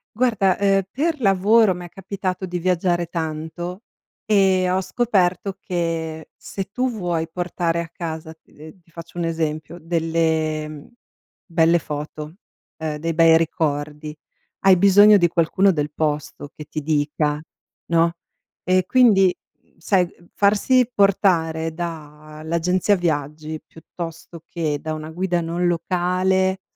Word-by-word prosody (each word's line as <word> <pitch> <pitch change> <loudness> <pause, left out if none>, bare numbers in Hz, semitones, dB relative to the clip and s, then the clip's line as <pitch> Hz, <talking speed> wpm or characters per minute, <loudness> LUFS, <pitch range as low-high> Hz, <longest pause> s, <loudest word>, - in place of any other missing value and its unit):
Guarda, 215 -6 +2
ehm, 195 -1 +3
per 305 +1 -1
lavoro 205 +1 +4
m'è 175 0 -8
capitato 190 +1 -4
di 180 -1 -4
viaggiare 175 -1 +1
tanto 165 +4 -5 0.4
e 190 -3 +3
ho 185 +1 +1
scoperto 190 -2 0
che 165 -3 -3
se 195 - -6
tu 250 +7 -2
vuoi 175 -6 -2
portare 175 -1 -2
a 170 - -3
casa, 160 -1 -6
ehm, 155 +4 -15
ti 170 - -28
faccio 165 +1 -11
un 175 - -1
esempio, 160 -1 -3
delle, 160 -2 0
mhmm, 150 -1 -10 0.6
belle 170 -2 +3
foto, 150 +1 -6 0.4
ehm, 155 -1 -3
dei 165 +2 -2
bei 165 0 +6
ricordi, 150 -2 -2 0.5
hai 190 -1 +8
bisogno 200 +3 +7
di 175 -3 +3
qualcuno 185 +4 +2
del 150 -3 -2
posto 150 -2 -3
che 150 - -10
ti 155 - -5
dica, 150 0 0 0.4
no, 170 0 +2 0.5
ehm, 185 +1 +3
quindi 200 -7 +5 0.4
sai, 180 +1 +1 0.2
farsi 225 +5 +3
portare 165 -5 +2
da 155 -2 -8
l'agenzia 180 +5 +1
viaggi 155 -1 -3
piuttosto 165 0 -9
che 155 -4 -2
da 155 - -4
una 155 0 -6
guida 175 +1 -1
non 170 +1 -1
locale, 185 +2 0
170 Hz, 130 wpm, -21 LUFS, 160-190 Hz, 0.6 s, hai